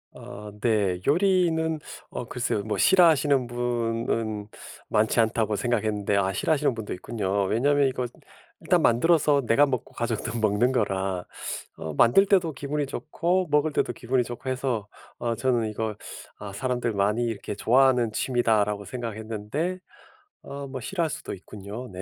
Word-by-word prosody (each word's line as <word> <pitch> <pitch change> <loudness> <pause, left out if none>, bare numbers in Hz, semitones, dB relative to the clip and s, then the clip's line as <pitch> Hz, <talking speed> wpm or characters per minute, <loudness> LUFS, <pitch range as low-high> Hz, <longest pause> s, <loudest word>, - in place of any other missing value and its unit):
아 105 +1 -9
네. 100 -6 +1
요리는 160 -2 +2 0.3
어 - - -5
글쎄요. 115 -4 -2
뭐 110 0 -2
'싫어하시는 150 -8 +4
분은 115 -3 -2 0.4
많지 110 +2 +2
않다.'고 110 -1 +2
생각했는데 105 -4 0
아 95 -1 +2
싫어하시는 145 - +1
분도 110 -2 -5
있군요. 100 0 -2
왜냐하면 140 +7 +3
이거 125 -1 -2 0.6
일단 - - +3
만들어서 145 +3 +4
내가 115 +6 +5
먹고 130 -4 -3
가족도 115 0 -2
먹는 110 +3 +2
거라 95 -6 -1 0.5
어 80 - -5
만들 120 - +5
때도 185 -5 +2
기분이 145 +2 -2
좋고 175 +5 -1
먹을 150 +1 +3
때도 - - 0
기분이 125 0 0
좋고 120 +2 -6
해서 125 -5 -2 0.3
어 115 -1 -1
저는 120 -4 +1
이거 110 0 -3 0.4
아 100 -1 -7
'사람들 125 +1 -1
많이 105 +4 +1
이렇게 110 -2 -4
좋아하는 125 +1 +3
취미다.'라고 105 -5 +1
생각했는데 115 - -4 0.6
어 140 0 -7
뭐 130 -1 -6
싫어할 170 +5 -1
수도 - - -6
있군요. 105 +6 -8
네. 95 -1 -7
120 Hz, 330 characters per minute, -26 LUFS, 105-140 Hz, 0.6 s, 내가